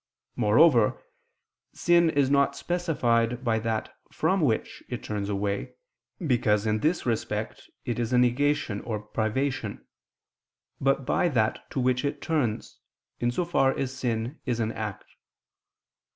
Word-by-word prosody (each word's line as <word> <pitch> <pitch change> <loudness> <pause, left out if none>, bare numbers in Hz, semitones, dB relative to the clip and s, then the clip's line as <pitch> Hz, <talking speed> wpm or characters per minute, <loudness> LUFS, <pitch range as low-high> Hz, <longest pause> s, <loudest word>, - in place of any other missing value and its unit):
Moreover 115 +1 +4 0.7
sin 170 -1 +4
is 140 -3 +2
not 140 -1 +3
specified 125 -9 0
by 115 -3 +1
that 110 0 -2 0.2
from 190 0 +1
which 120 -8 0
it 125 - -5
turns 105 -1 -3
away, 100 0 -2 0.5
because 110 -6 +2
in 110 0 +1
this 160 +8 0
respect 115 -3 -3 0.2
it 120 -1 -2
is 120 0 -1
a 125 - +3
negation 125 -2 +1
or 110 -3 -3
privation, 110 +6 -2 0.9
but 135 0 +1
by 175 - +2
that 110 -7 0
to - - -3
which 130 +1 +1
it 145 0 -2
turns, 140 -10 -2 0.4
in 120 - +1
so 170 +9 -1
far 135 -6 +2
as 130 -1 -2
sin 120 +1 -2
is 120 -3 -2
an 110 -1 0
act. 105 -3 -5
125 Hz, 135 wpm, -27 LUFS, 110-140 Hz, 0.9 s, Moreover